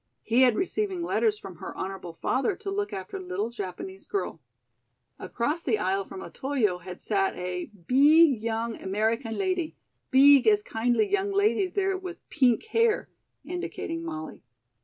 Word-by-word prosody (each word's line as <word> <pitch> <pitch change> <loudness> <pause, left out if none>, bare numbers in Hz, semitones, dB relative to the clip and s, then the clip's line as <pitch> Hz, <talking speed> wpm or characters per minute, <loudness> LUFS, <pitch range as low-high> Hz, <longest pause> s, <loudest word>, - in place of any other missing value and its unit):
He 235 +3 +3
had 250 -3 +5
receiving 380 - -1
letters 430 +4 +1
from - - -10
her - - -8
honorable 190 -3 -5
father 270 - 0
to 390 - -6
look 405 +1 -2
after 190 0 -6
little 185 +5 -3
Japanese 190 -3 -7
girl. 400 - -3 0.8
Across 290 +8 -2
the 235 -9 +1
aisle 195 0 0
from 190 - -8
Otoyo 245 -10 -1
had 180 +1 -9
sat 195 -2 0
a 180 0 -4
"beeg 270 - +4
young 225 0 -2
American 220 +4 -1
lady, 370 -4 -1 0.3
beeg 275 0 +7
as 420 -1 +5
kindly 240 - +1
young 400 0 0
lady 400 -1 +2
there 385 +1 0
with 370 -2 -8
peenk 255 -6 +3
hair," 455 0 +1 0.4
indicating 350 -2 -4
Molly. 155 - -6
260 Hz, 150 wpm, -27 LUFS, -, 0.8 s, beeg